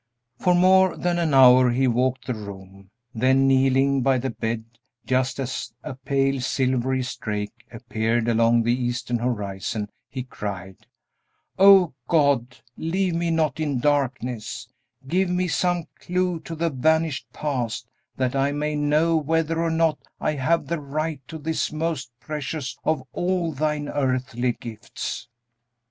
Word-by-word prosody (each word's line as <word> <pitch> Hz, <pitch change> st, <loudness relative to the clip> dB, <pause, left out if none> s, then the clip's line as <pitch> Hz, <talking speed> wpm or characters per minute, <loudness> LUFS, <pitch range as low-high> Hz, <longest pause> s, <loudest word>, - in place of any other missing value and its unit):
For 180 Hz, -1 st, +3 dB
more 185 Hz, 0 st, +5 dB
than 175 Hz, -1 st, 0 dB
an 160 Hz, -5 st, +1 dB
hour 130 Hz, -1 st, +7 dB
he 130 Hz, +2 st, +2 dB
walked 125 Hz, +2 st, 0 dB
the 125 Hz, -, -2 dB
room; 100 Hz, -2 st, -10 dB, 0.2 s
then 130 Hz, +3 st, +3 dB
kneeling 135 Hz, +1 st, +3 dB
by 135 Hz, 0 st, +3 dB
the 130 Hz, +1 st, -2 dB
bed, 110 Hz, 0 st, -3 dB, 0.4 s
just 130 Hz, +1 st, 0 dB
as 130 Hz, -3 st, -4 dB
a 150 Hz, -, -5 dB
pale, 135 Hz, 0 st, 0 dB
silvery 130 Hz, 0 st, 0 dB
streak 105 Hz, -4 st, -4 dB, 0.2 s
appeared 115 Hz, 0 st, -1 dB
along 115 Hz, 0 st, +3 dB
the 120 Hz, +1 st, +2 dB
eastern 120 Hz, -1 st, -2 dB
horizon, 105 Hz, -3 st, -3 dB, 0.2 s
he 130 Hz, -2 st, -5 dB
cried, 95 Hz, -6 st, -7 dB, 0.7 s
"O 195 Hz, -4 st, +7 dB
God, 140 Hz, -6 st, +2 dB, 0.2 s
leave 180 Hz, +3 st, 0 dB
me 170 Hz, 0 st, 0 dB
not 160 Hz, -3 st, 0 dB
in 145 Hz, -5 st, -1 dB
darkness; 130 Hz, -4 st, -1 dB, 0.4 s
give 185 Hz, +5 st, +1 dB
me 180 Hz, 0 st, 0 dB
some 175 Hz, +2 st, +1 dB, 0.2 s
clew 180 Hz, -1 st, -1 dB
to 165 Hz, -, -5 dB
the 165 Hz, +1 st, 0 dB
vanished 155 Hz, -2 st, +1 dB
past, 125 Hz, -7 st, -3 dB, 0.3 s
that 130 Hz, 0 st, 0 dB
I 135 Hz, +1 st, +2 dB
may 150 Hz, +1 st, -2 dB
know 150 Hz, +3 st, +2 dB
whether 160 Hz, +1 st, 0 dB
or 165 Hz, -, +1 dB
not 160 Hz, -1 st, +1 dB, 0.2 s
I -, -, 0 dB
have 155 Hz, +4 st, +1 dB
the 170 Hz, -1 st, -2 dB
right 150 Hz, +1 st, -3 dB
to 160 Hz, -, -7 dB
this 160 Hz, +1 st, -2 dB
most 155 Hz, -4 st, -2 dB
precious 145 Hz, -3 st, -4 dB
of 155 Hz, -4 st, 0 dB
all 175 Hz, -2 st, 0 dB
thine 150 Hz, 0 st, -1 dB
earthly 130 Hz, -3 st, -1 dB
gifts!" 115 Hz, 0 st, -7 dB
135 Hz, 145 wpm, -24 LUFS, 125-160 Hz, 0.7 s, hour